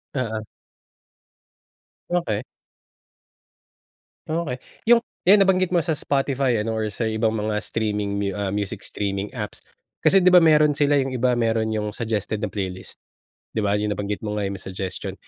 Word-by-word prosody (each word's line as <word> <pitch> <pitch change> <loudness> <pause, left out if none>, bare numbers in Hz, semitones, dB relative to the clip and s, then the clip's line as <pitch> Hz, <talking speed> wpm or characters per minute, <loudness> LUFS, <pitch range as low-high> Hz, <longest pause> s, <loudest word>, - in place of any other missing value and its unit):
Oo. 110 -4 -2 1.7
Okey. 170 -12 0 1.9
Okey, 155 -5 -2 0.3
yung 240 -1 +8 0.2
eh 200 +4 +7
nabanggit 185 -2 +3
mo 175 - +4
sa 160 0 0
Spotify, 135 -4 0
ano, 110 +1 -2
or 110 -1 -1
sa 115 - -2
ibang 110 0 +1
mga 105 0 -1
streaming 105 -2 -2
mu 100 -1 0
ah, 100 -2 -2
music 100 0 -3
streaming 100 0 -3
apps. 105 -5 -6 0.4
Kasi, 195 -2 +4
di 185 - +6
ba, 180 - +9
meron 155 -2 +5
sila 145 0 +2
yung 135 -1 +1
iba 125 -1 +1
meron 115 -1 +1
yung 105 -1 -2
suggested 110 -2 -2
na 105 - -1
playlist, 95 -2 -5 0.5
di - - -5
ba, 100 0 +1
yung 105 0 -1
nabanggit 105 0 -4
mo 105 -1 -3
nga 100 - -1
may 95 0 -4
suggestion. 95 -1 -5
110 Hz, 155 wpm, -23 LUFS, 105-140 Hz, 1.9 s, ba